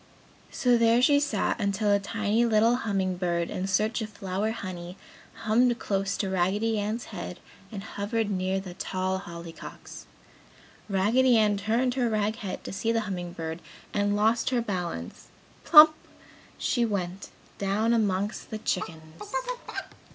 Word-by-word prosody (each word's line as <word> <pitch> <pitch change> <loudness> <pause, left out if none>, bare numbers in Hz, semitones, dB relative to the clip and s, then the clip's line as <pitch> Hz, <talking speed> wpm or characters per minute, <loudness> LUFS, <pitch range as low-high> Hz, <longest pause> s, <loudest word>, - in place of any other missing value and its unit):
So, 245 -2 +2
there 230 +1 +5
she 285 +3 +5
sat 240 -6 0
until 205 +1 +1
a 200 - +4
tiny 215 +2 0
little 230 +1 +4
humming 195 -6 -1
bird, 170 -2 -1
in 185 +1 -3
search 215 +4 +1
of 215 - -4
flower 200 0 -2
honey 185 -4 -6 0.5
hummed 235 +2 +3
close 195 -2 -1
to 195 - -1
Raggedy 205 +5 +1
Ann's 215 +2 -3
head 180 -1 -6 0.3
and 200 -2 -6
hovered 210 +1 -2
near 190 0 0
the 190 -2 -8
tall 185 0 -2
Hollyhocks. 170 -2 -10 0.8
Raggedy 230 +6 +4
Ann 210 -2 +3
turned 230 +5 0
her 245 -2 +1
rag 215 0 0
head 200 -5 -5
to - - -6
see 225 +4 0
the 225 -1 +1
humming 180 -4 -5
bird 165 -1 -5 0.3
and 205 0 +1
lost 220 +3 +2
her 255 -2 +1
balance 185 -7 -4 0.4
plump! 310 -1 +9 0.6
she 240 - +1
went, 195 -4 -3 0.3
down 205 +4 +1
amongst 205 -2 0
the 220 - -4
chickens. 160 -6 -4
205 Hz, 145 wpm, -27 LUFS, 190-225 Hz, 0.8 s, plump